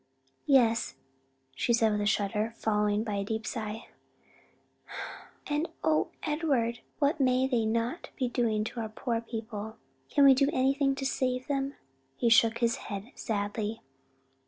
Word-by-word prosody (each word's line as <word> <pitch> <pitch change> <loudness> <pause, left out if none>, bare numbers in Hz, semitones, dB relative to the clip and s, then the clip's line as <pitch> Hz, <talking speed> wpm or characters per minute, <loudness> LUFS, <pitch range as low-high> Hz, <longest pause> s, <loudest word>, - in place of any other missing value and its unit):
"Yes," 240 -5 +3 0.6
she 235 - +1
said 225 -1 +4
with 210 0 0
a 205 - +1
shudder, 210 +2 0
followed 210 0 +1
by 210 -2 -2
a 200 - -1
deep 220 +2 -3
sigh, 220 -1 -5 1.6
"and 300 +3 -1
O 310 -1 +3 0.2
Edward 275 -7 0 0.2
what 295 +2 +1
may 255 -1 +3
they 240 -4 +1
not 230 +8 -1
be 255 - 0
doing 230 -3 +1
to 235 +2 -5
our 220 -1 -3
poor 230 +1 -2
people? 220 -2 -6 0.3
can 285 - +5
we 270 - +9
do 275 +2 +3
anything 275 +1 +2
to 270 0 -4
save 255 -1 0
them?" 275 0 -1 0.4
He 235 - +2
shook 230 0 +5
his 235 0 +1
head 205 +4 -7
sadly. 210 0 -3
230 Hz, 150 wpm, -29 LUFS, 220-265 Hz, 1.6 s, we